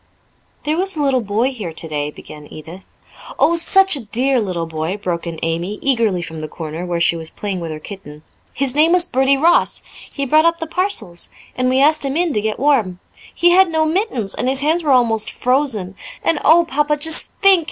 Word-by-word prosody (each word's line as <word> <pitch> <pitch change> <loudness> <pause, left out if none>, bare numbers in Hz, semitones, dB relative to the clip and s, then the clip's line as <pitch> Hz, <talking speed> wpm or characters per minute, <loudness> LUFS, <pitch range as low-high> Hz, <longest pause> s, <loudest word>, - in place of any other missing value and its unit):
"There 305 +2 -1
was 385 0 0
a - - -5
little 270 -3 +1
boy 220 +5 0
here 210 -10 -6
today," 150 -2 -4
began 150 0 -12
Edith. 165 +5 -11 0.5
"Oh, 340 - +3
such 385 +2 +4
a 265 -5 -6
dear 255 +5 +1
little 180 -5 -3
boy," 160 +4 -4
broke 175 -4 -4
in 165 -1 -6
Amy 170 +5 -2
eagerly 230 -10 0
from 160 -1 -8
the 155 - -5
corner, 160 +3 -7
where 175 -1 -2
she 170 0 +2
was 160 -1 -5
playing 200 -3 -5
with 165 -1 -5
her 155 - -5
kitten. 155 -4 -11 0.3
"His 270 -2 -2
name 315 +4 +4
was 360 -1 +4
Bertie 270 -3 +2
Ross. 335 +5 +2 0.3
He 280 - -3
brought 310 +4 +3
up 335 0 +2
the 325 - -3
parcels, 315 - -1 0.3
and 255 0 0
we 260 +1 +2
asked 305 +2 +3
him 275 +2 -2
in 345 -3 0
to 210 - 0
get 215 0 -2
warm. 240 -10 +1 0.3
He 345 0 +3
had 375 0 +5
no 320 -1 +1
mittens, 315 - -2
and 255 - -2
his 265 +1 -1
hands 315 +4 +1
were 305 - -3
almost 230 -5 +2
frozen. 250 -8 -1 0.3
And, 330 - +1
oh, 335 +3 +5
Papa, 295 0 0
just 320 +2 0
think! 390 -2 +6
255 Hz, 210 wpm, -18 LUFS, -, 0.5 s, think